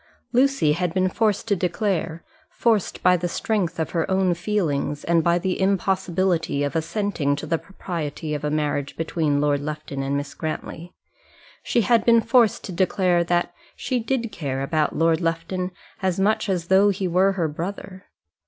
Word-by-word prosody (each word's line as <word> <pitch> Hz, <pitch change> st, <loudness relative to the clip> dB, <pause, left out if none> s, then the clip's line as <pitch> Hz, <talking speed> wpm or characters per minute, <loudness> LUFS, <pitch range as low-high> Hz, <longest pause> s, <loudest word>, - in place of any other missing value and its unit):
Lucy 255 Hz, -, +3 dB
had 175 Hz, +2 st, -1 dB
been 185 Hz, 0 st, +2 dB
forced 215 Hz, +2 st, 0 dB
to 205 Hz, -, +2 dB
declare 180 Hz, -2 st, -1 dB, 0.3 s
forced 220 Hz, -5 st, 0 dB
by 180 Hz, 0 st, +6 dB
the 175 Hz, 0 st, -1 dB
strength 180 Hz, -2 st, -1 dB
of 160 Hz, -, -2 dB
her 165 Hz, 0 st, -1 dB
own 190 Hz, -1 st, +2 dB
feelings, 170 Hz, -6 st, -1 dB
and 170 Hz, -1 st, +2 dB
by 170 Hz, +1 st, +3 dB
the 185 Hz, +1 st, -2 dB
impossibility 185 Hz, -5 st, +1 dB
of 145 Hz, -, -2 dB
assenting 165 Hz, -4 st, 0 dB
to 145 Hz, -, -6 dB
the 165 Hz, -1 st, 0 dB
propriety 160 Hz, -5 st, -5 dB
of 150 Hz, -, -4 dB
a 150 Hz, -, 0 dB
marriage 150 Hz, -2 st, -2 dB
between 160 Hz, -3 st, 0 dB
Lord 145 Hz, -1 st, +2 dB
Lufton 150 Hz, -2 st, -5 dB
and 135 Hz, +1 st, -1 dB
Miss 145 Hz, 0 st, -5 dB
Grantly, 160 Hz, +2 st, -5 dB, 0.7 s
she 235 Hz, -, +1 dB
had 230 Hz, -1 st, +3 dB
been 230 Hz, 0 st, +5 dB
forced 230 Hz, -1 st, +3 dB
to -, -, -6 dB
declare 180 Hz, -1 st, +2 dB
that 175 Hz, 0 st, 0 dB, 0.2 s
she 250 Hz, 0 st, -2 dB
did 235 Hz, -1 st, -2 dB
care 135 Hz, -7 st, -3 dB
about 155 Hz, +1 st, 0 dB
Lord 165 Hz, +1 st, +2 dB
Lufton 165 Hz, +2 st, -2 dB, 0.3 s
as 185 Hz, -1 st, 0 dB
much 215 Hz, +2 st, +1 dB
as 175 Hz, -3 st, -1 dB
though 195 Hz, +2 st, +5 dB
he 195 Hz, -1 st, -1 dB
were 185 Hz, +3 st, +3 dB
her 175 Hz, -4 st, 0 dB
brother. 185 Hz, +4 st, -6 dB
175 Hz, 170 wpm, -23 LUFS, 160-195 Hz, 0.7 s, by